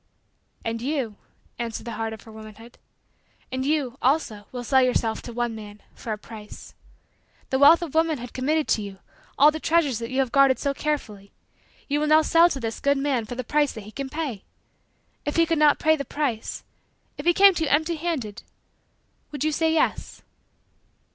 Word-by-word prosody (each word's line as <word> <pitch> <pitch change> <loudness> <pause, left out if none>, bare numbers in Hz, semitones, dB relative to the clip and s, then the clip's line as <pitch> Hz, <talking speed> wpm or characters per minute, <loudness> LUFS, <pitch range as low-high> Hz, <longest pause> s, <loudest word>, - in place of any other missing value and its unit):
"And 225 0 -2
you," 255 -6 -2 0.4
answered 230 -2 -4
the 235 - -5
heart 225 0 -3
of 220 -2 -9
her 225 - -13
womanhood, 220 +2 -13 0.7
"and 260 0 -2
you, 275 -3 -1
also, 250 -7 0
will 245 -1 -5
sell 265 +2 +4
yourself 240 -3 +1
to 240 - -8
one 240 0 -2
man, 210 -1 -10
for 225 - -7
a 215 - -2
price. 210 -1 -11 0.8
The 265 - +1
wealth 325 +5 +7
of 320 - -6
womanhood 315 -7 0
committed 300 +4 0
to 215 - +2
you 200 -1 -8 0.4
all 295 +2 +7
the 315 - -5
treasures 315 -8 +1
that 230 0 -5
you 260 - -4
have 265 -3 +1
guarded 275 -1 +5
so 280 -1 -1
carefully 215 -10 -4 0.6
you 290 +1 0
will 305 +1 +4
sell 330 +2 +5
now - - +7
to 280 -6 -3
this 225 -2 -4
good 280 0 +2
man 275 -5 0
for 245 - -7
the 255 - -4
price 295 +3 +1
that 220 - -8
he 210 - -11
can 275 +3 -5
pay. 280 -9 -4 0.8
If 290 - -3
he 330 - +4
could 330 -1 0
not 300 -1 +5
pay 315 0 +3
the 280 - -4
price 265 -5 -3 0.6
if 290 - -5
he - - +7
came 395 0 +7
to 335 - -1
you - - -2
empty 315 +3 +1
handed 300 -11 -3 0.9
would 290 -2 -4
you 310 - +1
say 320 +1 +1
yes?" 320 - -1
265 Hz, 195 wpm, -24 LUFS, 225-305 Hz, 0.9 s, wealth